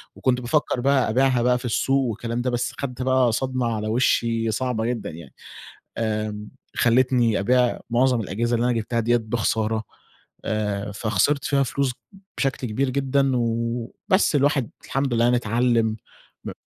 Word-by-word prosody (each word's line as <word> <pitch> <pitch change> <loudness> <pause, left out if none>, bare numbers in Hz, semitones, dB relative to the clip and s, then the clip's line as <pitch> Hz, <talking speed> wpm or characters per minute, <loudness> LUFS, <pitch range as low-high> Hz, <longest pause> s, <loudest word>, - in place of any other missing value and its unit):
وكنت 125 -1 0
بافَكّر 125 +1 0
بقى 135 -1 +2
أبيعها 130 +1 +2
بقى 125 +1 +3
في 125 - -9
السوق 135 +3 +1
والكلام 115 +2 -3
ده، 125 - -1
بس 120 0 -2
خَدت 130 -2 -4
بقى 130 -2 +3
صدمة 130 +1 -1
على 110 0 -3
وشّي 115 -1 +1
صعبة 115 0 -1
جدًا 120 -2 -2
يعني. 80 -3 -11 0.6
آمم، 105 -1 -3 0.3
خلّتني 120 -2 +3
أبيع 125 +4 +2
معظم 125 0 +2
الأجهزة 115 +5 -1
اللي 115 - 0
أنا 125 - +2
جبتها 115 +2 -2
دِيّة 120 +1 +2
بخسارة، 110 -1 -1 0.6
آآ، 105 -1 -2
فخسِرت 110 +7 0
فيها 140 -1 +2
فلوس 135 +1 -1 0.5
بشكل 135 -2 -1
كبير 130 +5 -1
جدًا 135 0 +1
و 115 0 -2 0.2
بس، 190 -4 +3
الواحد 140 -4 +2 0.2
الحمد 135 -2 -1
لله 115 - +2
يعني 120 0 +3
اتعلّم، 115 -1 +1 0.5
ب - - -5
120 Hz, 155 wpm, -23 LUFS, 110-130 Hz, 0.6 s, بقى